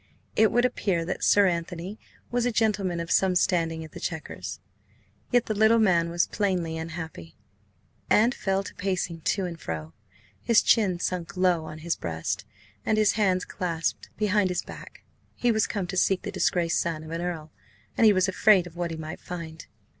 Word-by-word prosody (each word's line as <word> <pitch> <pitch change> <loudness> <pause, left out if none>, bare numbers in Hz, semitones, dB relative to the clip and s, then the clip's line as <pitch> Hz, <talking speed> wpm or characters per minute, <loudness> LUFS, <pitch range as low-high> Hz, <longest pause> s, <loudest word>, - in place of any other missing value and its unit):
It 220 -1 +4
would 240 +1 +3
appear 190 -8 0
that 185 - -4
Sir 205 -1 +5
Anthony 175 +3 -3 0.3
was 245 0 +1
a - - +1
gentleman 205 -6 +1
of 170 0 -4
some 190 -1 +3
standing 165 -3 +1
at 155 - -13
the - - -9
Chequers. 160 -2 -5 0.7
Yet 245 -1 +3
the 215 - -1
little 220 +2 +5
man 175 -6 +3
was 170 +1 +2
plainly 180 -6 -1
unhappy, 160 - -7 0.7
and 230 +4 +4
fell 195 -4 -1
to - - -9
pacing 180 -3 -2
to 195 +4 0
and 170 -2 -6
fro, 80 0 -5 0.5
his 235 -3 +4
chin 195 -6 +3
sunk 180 -1 -3
low 180 -3 +2
on 155 - -8
his 170 - +1
breast, 80 +5 -3 0.4
and 215 - +1
his 215 -1 +4
hands 190 -4 +1
clasped 165 -3 -3
behind 210 -2 +2
his 180 - -1
back. - - -11 0.3
He 245 - +2
was 220 -1 +2
come 200 -3 -2
to 190 +2 -5
seek 190 0 +2
the - - -4
disgraced 170 -2 +1
son 160 -2 -3
of 160 - -9
an 165 +1 -3
Earl, 165 -3 -4 0.4
and - - +2
he 220 - +8
was 185 -2 +3
afraid 190 -1 +4
of 175 -1 -11
what 175 0 -2
he 165 - -5
might 160 0 -7
find. 165 -2 -7
180 Hz, 190 wpm, -26 LUFS, 165-205 Hz, 0.7 s, he